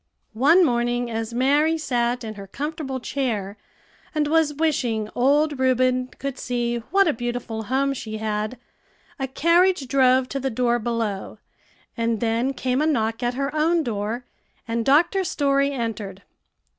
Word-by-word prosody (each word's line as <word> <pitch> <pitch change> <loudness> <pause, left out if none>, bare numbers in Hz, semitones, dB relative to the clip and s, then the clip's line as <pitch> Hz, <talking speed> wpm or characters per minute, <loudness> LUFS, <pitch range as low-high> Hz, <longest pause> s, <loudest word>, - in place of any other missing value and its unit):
One 310 +11 +5
morning, 240 -2 0
as 225 0 -3
Mary 290 +6 +2
sat 245 -4 -1
in 220 -1 -5
her 200 -2 -10
comfortable 290 - -4
chair, 225 -7 -2 0.6
and 305 -1 +2
was 310 -1 +2
wishing 255 -9 0
old 290 +3 +2
Reuben 255 -1 +2
could 275 -1 -5
see 240 -1 -1
what 390 +1 +4
a 310 - +3
beautiful 235 -2 -4
home 275 +4 +1
she 220 -4 -6
had, 215 +2 -2 0.6
a 270 - -1
carriage 335 +2 +3
drove 260 -1 +3
to 275 - -3
the 270 0 -1
door 240 0 +1
below, 225 -4 -3 0.6
and 230 -2 0
then 230 +3 0
came 255 +1 0
a 305 - +2
knock 225 -6 0
at 240 0 -1
her 275 +2 -2
own 325 +2 +2
door, 225 0 -3 0.4
and 230 0 -1
Dr. 335 +7 +4
Story 280 -4 +1
entered. 220 -6 -4
255 Hz, 150 wpm, -23 LUFS, 230-285 Hz, 0.6 s, One